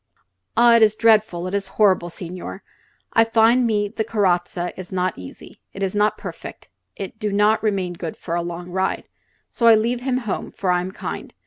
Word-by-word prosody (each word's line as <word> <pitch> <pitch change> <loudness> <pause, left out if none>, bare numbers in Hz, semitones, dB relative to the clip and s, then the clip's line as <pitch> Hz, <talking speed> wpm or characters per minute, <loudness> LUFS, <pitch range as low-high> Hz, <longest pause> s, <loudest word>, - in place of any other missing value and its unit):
"Ah, 235 0 +6
it - - +2
is 215 -1 +5
dreadful; 215 -6 +3
it 185 - -5
is 200 -1 -1
horrible, 190 -5 +3
signore. 180 +2 -8 0.5
I 225 - +6
find 230 +2 +3
me 210 -2 +1
the 220 +2 -3
carrozza 180 -5 0
is 185 -1 -9
not 185 -1 -1
easy; 90 0 -12
it 195 - -5
is 190 - -1
not 210 +1 +1
perfect; - - -9 0.3
it 200 +2 -7
do 210 -2 -2
not 210 +2 +3
remain 195 -5 -1
good 165 -1 -6
for 165 - -6
a 170 - 0
long 175 +1 -6
ride. 190 +1 -1 0.5
So 235 - +1
I 225 - +9
leave 235 +3 0
him 255 0 0
home, 220 -6 -4
for 185 -3 -1
I 180 0 +2
am 185 +1 -5
kind. - - -7
200 Hz, 200 wpm, -21 LUFS, 180-220 Hz, 0.5 s, I